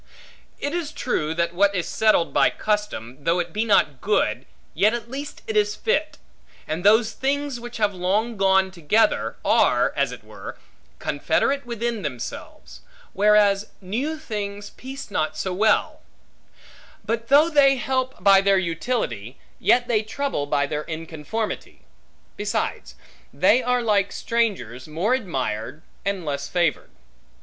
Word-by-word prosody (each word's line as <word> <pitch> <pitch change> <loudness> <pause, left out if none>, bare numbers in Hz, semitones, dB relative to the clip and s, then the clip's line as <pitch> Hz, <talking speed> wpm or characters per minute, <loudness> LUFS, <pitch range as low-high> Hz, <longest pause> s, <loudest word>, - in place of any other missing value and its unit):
It 285 - -3
is 335 -4 -2
true, 160 - -2
that 170 0 0
what 200 +2 +3
is 180 - -1
settled 215 -6 +2
by - - +5
custom, 180 - -3
though 165 +3 +2
it 175 -2 -3
be 215 - 0
not 155 -10 +2
good, 210 +1 0 0.3
yet 215 +3 +3
at 235 0 -7
least 280 +2 -7
it 220 - -4
is 210 0 +2
fit; 290 +7 -1 0.5
and 160 +3 -3
those 220 +2 +5
things 280 0 -2
which 240 0 -8
have 210 -2 +1
long 200 +6 0
gone 190 -1 +3
together, 185 +5 +1
are, - - +3
as - - +1
it - - -10
were, - - -9 0.4
confederate 280 -2 0
within 235 -1 -2
themselves; 115 - -7 0.3
whereas 205 0 +4
new 245 +12 -3
things 205 -7 -5
piece 265 -3 -9
not 155 -3 -1
so 185 +3 -2
well; 215 +3 +2 1.0
but 230 +1 -2
though 290 +5 +6
they 275 -3 +5
help 260 -5 -2
by 195 -1 +7
their 195 0 +3
utility, 165 - -2 0.2
yet 240 0 +3
they 220 -3 +2
trouble 220 - -3
by 145 -1 +1
their 150 +1 -3
inconformity. 165 +7 -5 0.5
Besides, 205 0 -3 0.4
they 255 - +4
are 250 0 +1
like 200 -3 +2
strangers; 205 - -2
more 170 +10 0
admired, 140 - -3 0.2
and 195 -3 -2
less 140 -1 -3
favored. 175 -1 0
205 Hz, 140 wpm, -23 LUFS, 170-235 Hz, 1.0 s, by